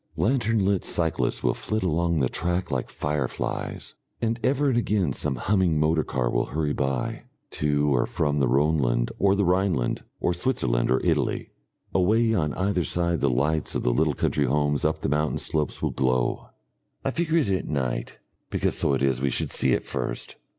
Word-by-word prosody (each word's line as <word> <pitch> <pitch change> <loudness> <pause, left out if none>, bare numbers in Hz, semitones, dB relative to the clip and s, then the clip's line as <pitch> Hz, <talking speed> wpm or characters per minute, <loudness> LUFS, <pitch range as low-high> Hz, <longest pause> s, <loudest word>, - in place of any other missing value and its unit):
Lantern 115 -4 +1
lit 100 -1 +1
cyclists 80 -2 +1
will - - +2
flit 110 - -3
along 85 -1 +1
the 65 - +3
track 90 +6 -2
like 65 -2 -2
fireflies, 75 -4 -3 0.3
and 115 +1 -1
ever 140 +3 +2
and 130 - +1
again 100 - 0
some 65 - -1
humming 85 +3 +1
motor 80 +1 +2
car 60 -2 -1
will - - 0
hurry 75 +2 -1
by, 75 - -2 0.3
to 75 -1 +1
or - - +1
from 75 -1 0
the 70 - +2
Rhoneland 65 -3 +1
or 100 0 +4
the 100 -1 +1
Rhineland 90 -7 +1 0.2
or 90 - +1
Switzerland 65 - 0
or - - +2
Italy. - - 0 0.4
Away 110 +5 +3
on 75 -8 0
either 95 -1 0
side 85 +1 0
the 70 - +3
lights 75 +5 0
of - - -1
the - - +2
little 75 +2 +1
country 70 - 0
homes 75 +2 +1
up - - 0
the - - -1
mountain 75 +2 0
slopes 75 -1 -1
will - - +1
glow. 65 -2 0 0.6
I 135 - +1
figure 165 +2 0
it 145 -11 +2
at 95 -2 -1
night, 65 -5 -2 0.3
because - - 0
so 70 - +2
it 65 - -1
is 65 -2 +1
we 70 - +1
should - - -1
see 65 - +4
it - - 0
first. - - -4
80 Hz, 185 wpm, -25 LUFS, 70-95 Hz, 0.6 s, or